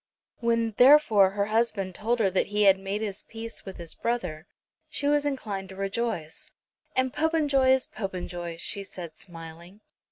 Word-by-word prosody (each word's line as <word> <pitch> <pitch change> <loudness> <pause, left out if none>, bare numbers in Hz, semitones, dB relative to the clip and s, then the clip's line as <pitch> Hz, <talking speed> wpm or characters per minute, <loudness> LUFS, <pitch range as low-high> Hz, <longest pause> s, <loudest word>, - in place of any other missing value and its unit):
When, 230 -1 +1
therefore, 245 -7 +7
her 200 +1 -1
husband 215 -3 0
told 230 +6 0
her 200 -5 +2
that 185 - +1
he 210 +1 +1
had 195 -1 +6
made 195 +2 -3
his 205 -2 -3
peace 225 0 -8
with 190 - -8
his 170 -2 -8
brother 180 -9 -3 0.4
she 285 - -2
was 290 0 +3
inclined 205 -9 -4
to 190 - -9
rejoice. 195 - -3 0.5
"And 260 0 +1
Popenjoy 295 -4 +2
is 260 0 +4
Popenjoy," 175 -4 -5
she 200 +3 -2
said 170 -4 -9
smiling. 170 +3 -11
205 Hz, 160 wpm, -27 LUFS, 190-240 Hz, 0.5 s, therefore